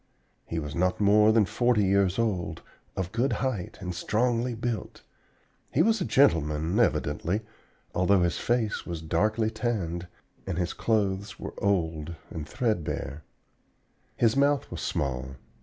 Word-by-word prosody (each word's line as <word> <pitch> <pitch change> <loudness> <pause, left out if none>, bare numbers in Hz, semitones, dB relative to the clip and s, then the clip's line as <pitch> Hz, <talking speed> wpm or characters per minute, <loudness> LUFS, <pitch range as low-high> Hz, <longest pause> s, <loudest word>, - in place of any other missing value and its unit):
He 85 - -3
was 75 -2 -3
not 90 +1 +1
more 105 +1 +5
than 110 -2 +4
forty 120 +2 +2
years 95 -1 +2
old, 95 -8 -1 0.3
of 95 -1 -2
good 120 +5 +1
height 120 -10 -2
and 90 -2 -4
strongly 120 +6 0
built. 115 0 -4 0.7
He - - +3
was 225 -2 +2
a - - +1
gentleman, 80 - +3
evidently, 95 -2 +1 0.5
although 95 0 +3
his 85 -3 0
face 120 -3 0
was 85 -2 -6
darkly 110 +7 +1
tanned 90 -9 -2 0.4
and 95 -3 -2
his 90 -1 -1
clothes 100 -3 -1
were - - -6
old 85 -5 0 0.2
and 80 -1 -6
threadbare. 80 - -2 0.9
His 115 -2 +3
mouth 140 -1 +2
was - - -5
small. 65 -1 -2
100 Hz, 140 wpm, -27 LUFS, 85-115 Hz, 0.9 s, more